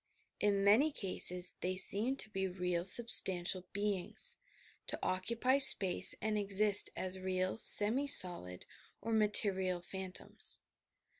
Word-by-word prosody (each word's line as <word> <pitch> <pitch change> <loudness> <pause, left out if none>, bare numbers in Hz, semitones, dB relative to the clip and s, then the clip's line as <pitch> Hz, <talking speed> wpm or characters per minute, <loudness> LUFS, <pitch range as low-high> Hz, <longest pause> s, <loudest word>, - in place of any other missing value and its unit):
In 200 -1 -3
many 230 +10 +1
eases, 180 -1 0
they 185 +1 -6
seem 215 +7 -1
to 245 - -9
be 190 -1 -6
real 180 -2 -6
substantial 185 -4 +1
beings, 205 - -5 0.3
— - - -32
to - - -3
occupy 235 +8 -4
space 195 -9 +7
and 215 0 -5
exist 205 0 0
as 185 0 -6
real 185 0 -6
semi 230 +7 +2
solid, 175 - +4 0.3
or 225 +2 -8
material 200 -4 +1
phantoms. 185 +1 -5
195 Hz, 125 wpm, -31 LUFS, 185-215 Hz, 0.3 s, space